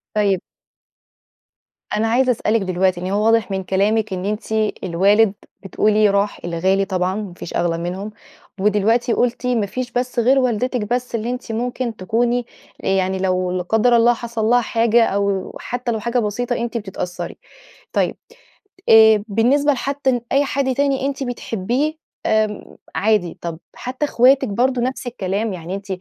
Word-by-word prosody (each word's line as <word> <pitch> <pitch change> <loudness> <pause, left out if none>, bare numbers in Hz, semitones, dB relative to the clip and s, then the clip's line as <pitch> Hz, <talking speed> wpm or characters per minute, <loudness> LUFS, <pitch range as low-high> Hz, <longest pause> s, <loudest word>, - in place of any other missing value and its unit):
طيب 200 -3 +2 1.5
أنا 220 +1 +1
عايزة 250 +3 +3
أسألِك 220 -1 0
دلوقتي 185 -1 0
إن 180 - -3
هو 210 +1 +1
واضح 225 -2 +3
من 190 0 -2
كلامِك 205 +3 +1
إن 185 0 -4
أنتِ 210 +2 -4 0.3
الوالد 195 +4 +3 0.3
بتقولي 210 +2 +2
راح، 200 +1 0
الغالي 190 +3 +1
طبعًا 185 -1 -1
ما 205 -4 -5
فيش 175 - -8
أغلى 170 -1 0
منهم، 185 +5 -4 0.5
ودلوقتي 210 +4 +2
قلتِ 245 0 0
ما 235 -4 +1
فيش 245 +5 -5
بس 250 0 -1
غير 260 +4 +4
والدتِك 250 -1 0
بس 250 -1 -2
اللي 230 +1 -2
أنتِ 250 -1 -5
ممكن 240 +1 -2
تكوني 235 +5 0 0.4
آآ، - - -3
يعني 190 0 +1
لو- 185 -1 0
لا 180 0 -2
قدَّر 225 +6 +3
الله- 235 +1 +5
حصل 230 -2 -2
لها 245 +2 +4
حاجة، 230 0 +3
أو 200 -1 -1
حتى 245 0 -3
لو 220 - -1
حاجة 235 +3 0
بسيطة 240 +3 -1
أنتِ 235 0 -3
بتتأثري 190 -4 -5 0.6
طيب - - +1 0.7
آآ، 220 -1 +7
بالنسبة 250 +8 +3
لحتى 270 -2 -1
أي 280 +1 +3
حد 270 -1 0
تاني 275 -1 +1
أنتِ 275 0 -2
بتحبيه 245 +4 -2 0.3
آمم، 215 -1 0 0.2
عادي، 205 -5 +1
طب 165 -2 -5 0.2
حتى 260 +4 -3
اخواتك 265 +1 +4
برضه 245 +4 +1
نفس 255 +1 -3
الكلام؟ 205 -1 -2
يعني 180 +1 -5
أنتِ 200 +1 -8
220 Hz, 155 wpm, -20 LUFS, 195-245 Hz, 1.5 s, آآ